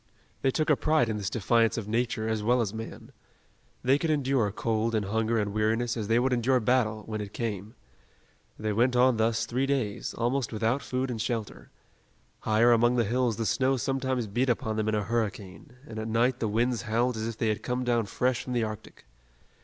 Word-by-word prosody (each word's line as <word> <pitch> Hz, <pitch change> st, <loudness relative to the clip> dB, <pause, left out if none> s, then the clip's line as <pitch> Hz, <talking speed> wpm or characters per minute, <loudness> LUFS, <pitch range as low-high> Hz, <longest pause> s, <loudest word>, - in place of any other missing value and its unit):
They 135 Hz, -, +2 dB
took 155 Hz, +3 st, +1 dB
a -, -, +6 dB
pride 155 Hz, -5 st, +2 dB
in 110 Hz, -, -1 dB
this 100 Hz, -1 st, -2 dB
defiance 115 Hz, +2 st, +2 dB
of 110 Hz, -3 st, -4 dB
nature 115 Hz, 0 st, -1 dB
as 110 Hz, -1 st, -1 dB
well 120 Hz, +4 st, +2 dB
as 110 Hz, -4 st, -1 dB
man. 110 Hz, 0 st, -8 dB, 0.7 s
They 135 Hz, +3 st, +3 dB
could 165 Hz, -, -1 dB
endure 135 Hz, -7 st, +1 dB
cold 115 Hz, +1 st, -1 dB
and 105 Hz, -2 st, 0 dB
hunger 110 Hz, +3 st, 0 dB
and 105 Hz, -2 st, -1 dB
weariness 115 Hz, +2 st, 0 dB
as 110 Hz, -4 st, -3 dB
they 115 Hz, +1 st, +3 dB
would 130 Hz, +1 st, +2 dB
endure 125 Hz, +2 st, +2 dB
battle, 110 Hz, -2 st, +1 dB
when 110 Hz, -1 st, -4 dB
it 105 Hz, -1 st, -7 dB
came. 110 Hz, -1 st, -4 dB, 0.8 s
They 110 Hz, -1 st, -2 dB
went 125 Hz, +4 st, +2 dB
on 125 Hz, -1 st, +4 dB
thus 110 Hz, 0 st, +1 dB
three 130 Hz, +3 st, -1 dB
days, 130 Hz, -8 st, -2 dB
almost 120 Hz, +2 st, -1 dB
without 115 Hz, +5 st, 0 dB
food 130 Hz, 0 st, -2 dB
and 115 Hz, -3 st, -3 dB
shelter. 110 Hz, -, -4 dB, 0.7 s
Higher 110 Hz, +3 st, +3 dB
among 120 Hz, +1 st, +4 dB
the 120 Hz, -, +3 dB
hills 120 Hz, 0 st, 0 dB
the 115 Hz, -, -2 dB
snow 130 Hz, +3 st, +2 dB
sometimes 130 Hz, -1 st, -1 dB
beat 120 Hz, +6 st, 0 dB
upon 110 Hz, -2 st, 0 dB
them 110 Hz, 0 st, 0 dB
in 110 Hz, -, +1 dB
a 105 Hz, -, 0 dB
hurricane, 105 Hz, -4 st, -3 dB
and 110 Hz, -5 st, -7 dB
at 110 Hz, -, -4 dB
night 120 Hz, +3 st, +1 dB
the 115 Hz, -, 0 dB
winds 120 Hz, +3 st, 0 dB
howled 120 Hz, +2 st, 0 dB
as 110 Hz, 0 st, -3 dB
if 115 Hz, -1 st, -5 dB
they 115 Hz, -, 0 dB
had 105 Hz, -, -1 dB
come 125 Hz, 0 st, -2 dB
down 120 Hz, -3 st, +1 dB
fresh 125 Hz, +3 st, 0 dB
from 125 Hz, -, -4 dB
the 120 Hz, -2 st, +1 dB
Arctic. 110 Hz, -, -7 dB
115 Hz, 210 wpm, -28 LUFS, 110-125 Hz, 0.8 s, a